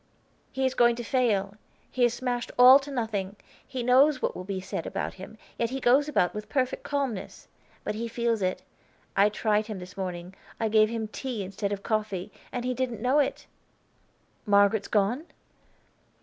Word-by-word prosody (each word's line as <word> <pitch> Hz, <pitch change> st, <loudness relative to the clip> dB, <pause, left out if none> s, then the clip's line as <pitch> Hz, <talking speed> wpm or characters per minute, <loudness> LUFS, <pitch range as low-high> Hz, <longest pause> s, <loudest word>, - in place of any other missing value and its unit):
"He 265 Hz, 0 st, -1 dB
is 260 Hz, -, +1 dB
going 240 Hz, -1 st, +4 dB
to 240 Hz, -, -5 dB
fail, 210 Hz, -5 st, 0 dB, 0.3 s
he 255 Hz, -, 0 dB
is 240 Hz, 0 st, +3 dB
smashed 245 Hz, -1 st, -3 dB
all 255 Hz, +2 st, +9 dB
to 285 Hz, +1 st, -9 dB
nothing. 215 Hz, -7 st, -3 dB, 0.3 s
He 255 Hz, -2 st, -4 dB
knows 260 Hz, +3 st, +5 dB
what -, -, -2 dB
will 180 Hz, -, -6 dB
be 190 Hz, 0 st, -4 dB
said 185 Hz, -, -5 dB
about -, -, -3 dB
him, -, -, -11 dB, 0.2 s
yet 235 Hz, -, +1 dB
he 265 Hz, +2 st, -3 dB
goes 270 Hz, +4 st, +3 dB
about 180 Hz, -11 st, +2 dB
with 210 Hz, 0 st, -7 dB
perfect 260 Hz, -2 st, 0 dB
calmness. 275 Hz, -8 st, -4 dB, 0.4 s
But 210 Hz, -, -2 dB
he 230 Hz, +2 st, -4 dB
feels 230 Hz, -1 st, -1 dB
it. 185 Hz, 0 st, -1 dB, 0.5 s
I 200 Hz, +1 st, +5 dB
tried 215 Hz, 0 st, 0 dB
him 215 Hz, -3 st, -5 dB
this 180 Hz, 0 st, -10 dB
morning, 180 Hz, -1 st, -5 dB, 0.3 s
I 225 Hz, -, 0 dB
gave 215 Hz, 0 st, +4 dB
him 225 Hz, -1 st, -3 dB
tea 235 Hz, -1 st, -4 dB
instead 200 Hz, +2 st, -4 dB
of 200 Hz, -1 st, -4 dB
coffee, 210 Hz, -4 st, -2 dB, 0.2 s
and 245 Hz, -1 st, -4 dB
he 255 Hz, -, 0 dB
didn't 245 Hz, -3 st, -2 dB
know 255 Hz, +6 st, +2 dB
it!" 280 Hz, -, -1 dB, 1.0 s
"Margaret's 200 Hz, 0 st, +4 dB
gone?" 225 Hz, +9 st, +1 dB
225 Hz, 180 wpm, -27 LUFS, 200-255 Hz, 1.0 s, all